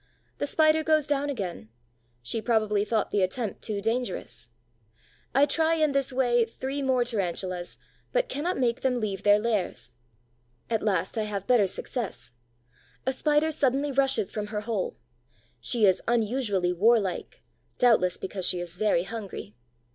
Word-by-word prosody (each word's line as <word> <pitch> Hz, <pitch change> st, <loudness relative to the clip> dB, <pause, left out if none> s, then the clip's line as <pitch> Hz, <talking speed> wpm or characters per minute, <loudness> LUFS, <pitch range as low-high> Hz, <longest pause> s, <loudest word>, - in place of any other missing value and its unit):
The 285 Hz, -, -1 dB
Spider 315 Hz, +1 st, +4 dB
goes 310 Hz, -2 st, +3 dB
down 290 Hz, -1 st, 0 dB
again: 180 Hz, -, -5 dB, 0.5 s
she 220 Hz, -, -2 dB
probably 215 Hz, -3 st, +1 dB
thought 215 Hz, 0 st, -1 dB
the 205 Hz, -, +2 dB
attempt 200 Hz, +3 st, -2 dB
too 210 Hz, -2 st, -2 dB
dangerous. 225 Hz, -, -3 dB, 0.9 s
I 275 Hz, +2 st, +6 dB
try 320 Hz, +3 st, +2 dB
in 310 Hz, -2 st, +2 dB
this 275 Hz, -1 st, 0 dB
way 245 Hz, -2 st, +3 dB
three 265 Hz, +5 st, -4 dB
more 260 Hz, -2 st, +2 dB
Tarantulas, 185 Hz, -5 st, -3 dB, 0.3 s
but -, -, +1 dB
cannot 350 Hz, -, -2 dB
make 240 Hz, -2 st, 0 dB
them 255 Hz, -2 st, +1 dB
leave 200 Hz, -4 st, -3 dB
their 205 Hz, 0 st, +5 dB
lairs. 210 Hz, -3 st, -2 dB, 0.8 s
At 225 Hz, -, +1 dB
last 190 Hz, +1 st, 0 dB
I 215 Hz, -, 0 dB
have 200 Hz, -2 st, -4 dB
better 240 Hz, -6 st, +4 dB
success. 185 Hz, -, -5 dB, 0.7 s
A 265 Hz, -, +1 dB
Spider 300 Hz, +3 st, +2 dB
suddenly 280 Hz, -1 st, +1 dB
rushes 265 Hz, -6 st, +1 dB
from 210 Hz, -1 st, -4 dB
her 210 Hz, 0 st, -3 dB
hole: 235 Hz, -, -3 dB, 0.6 s
she 230 Hz, -4 st, +1 dB
is 190 Hz, -2 st, +3 dB
unusually 220 Hz, -6 st, +1 dB
warlike, 200 Hz, 0 st, +1 dB, 0.3 s
doubtless 215 Hz, -8 st, +3 dB
because 190 Hz, -1 st, -3 dB
she 180 Hz, -, 0 dB
is 175 Hz, 0 st, -4 dB
very 210 Hz, -5 st, +2 dB
hungry. 200 Hz, -, -7 dB
230 Hz, 150 wpm, -27 LUFS, 200-270 Hz, 0.9 s, I